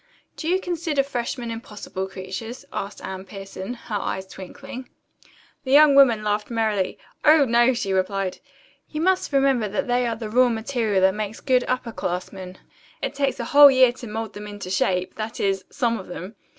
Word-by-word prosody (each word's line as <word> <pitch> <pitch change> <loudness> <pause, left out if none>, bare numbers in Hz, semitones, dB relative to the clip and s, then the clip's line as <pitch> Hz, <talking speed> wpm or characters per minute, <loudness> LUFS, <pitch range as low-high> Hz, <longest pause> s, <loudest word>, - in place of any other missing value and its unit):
"Do 315 - -6
you 365 +2 +2
consider 335 -6 -1
freshmen 245 -2 -4
impossible 210 -4 -6
creatures?" 190 +6 -7
asked 200 +1 -5
Anne 190 0 -6
Pierson, 195 +3 -7
her 230 -3 -5
eyes 190 0 -3
twinkling. 255 +8 -9 0.7
The 265 -2 -1
young 295 0 +8
woman 245 -6 +6
laughed 210 0 -1
merrily. 220 -5 0 0.3
"Oh, 305 -1 +6
no," 240 +1 +4
she 200 -5 -2
replied. 190 0 -1 0.5
"You 305 - -5
must 370 +1 +1
remember 270 -6 +2
that 200 - -2
they 245 0 +1
are 230 - -1
the 225 -1 -6
raw 250 +2 +5
material 225 -3 0
that 190 0 +4
makes 215 +1 -4
good 255 -2 +2
upper 250 -2 -2
classmen. 185 -1 -5 0.5
It - - -1
takes 275 -2 -1
a 235 - -2
whole 285 +3 +9
year 260 -2 +5
to 245 0 -10
mould 220 0 -5
them 210 0 -8
into 205 -3 -7
shape 185 -1 0
that 220 0 -5
is, 195 -1 0
some 235 -4 0
of 190 - -10
them. 180 +3 -7
225 Hz, 180 wpm, -23 LUFS, 195-260 Hz, 0.7 s, whole